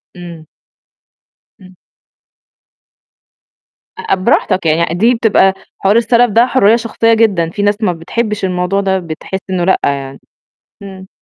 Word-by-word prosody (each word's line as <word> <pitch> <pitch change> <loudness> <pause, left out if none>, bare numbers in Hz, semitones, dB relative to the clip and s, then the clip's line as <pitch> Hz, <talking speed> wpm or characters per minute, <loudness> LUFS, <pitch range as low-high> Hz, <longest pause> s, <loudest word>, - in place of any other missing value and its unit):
إمم. 170 -3 -11 1.2
إمم. 185 0 -16 2.2
أ - - -1
براحتك 185 0 0
يعني، 165 +1 +1
دي 230 +7 +2
بتبقى 205 -4 +2 0.3
حوار 195 +3 +1
السَلَف 235 0 +2
ده 235 +4 +4
حُرّية 230 -4 +3
شخصية 230 0 0
جدًا، 200 -8 +1
في 205 - -5
ناس 205 0 +1
ما 185 - +1
بتحبّش 205 +5 -3
الموضوع 180 +2 -1
ده، 190 -1 0
بتحس 170 +3 -6
إنه 180 -2 -1
لأ 190 - +2
يعني. 135 -1 -3 0.6
إمم. 190 -1 -11
190 Hz, 130 wpm, -13 LUFS, 175-220 Hz, 2.2 s, ده